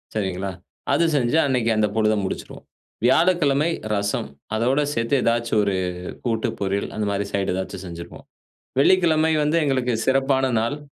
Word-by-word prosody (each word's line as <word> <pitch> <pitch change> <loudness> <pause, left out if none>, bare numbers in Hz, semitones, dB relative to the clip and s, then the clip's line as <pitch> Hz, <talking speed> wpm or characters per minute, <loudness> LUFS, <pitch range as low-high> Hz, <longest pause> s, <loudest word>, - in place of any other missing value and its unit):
சரிங்களா, 95 -2 -2 0.4
அது 170 - +3
செஞ்சு 130 +2 +2
அன்னைக்கு 125 -4 +1
அந்த 105 0 +3
பொழுத 110 0 +3
முடிச்சுருவோம். - - -6 0.4
வியாழக்கிழமை 155 +1 +3 0.3
ரசம், 100 -7 -2 0.3
அதோட 125 +6 +2
சேர்த்து 115 +3 +1
ஏதாச்சும் 115 -2 +1
ஒரு 100 -1 0 0.5
கூட்டு, 115 -2 0
பொரியல் 100 0 -1
அந்த 105 -1 -1
மாரி 100 0 -2
சைட் 100 -2 0
ஏதாச்சும் 95 0 -5
செஞ்சுருப்போம். 85 0 -9 0.5
வெள்ளிக்கிழமை 160 -1 +4
வந்து 150 +3 +1
எங்களுக்கு 130 -3 0
சிறப்பான 135 0 +2
நாள். 120 +6 -2
115 Hz, 135 wpm, -22 LUFS, 100-140 Hz, 0.5 s, வெள்ளிக்கிழமை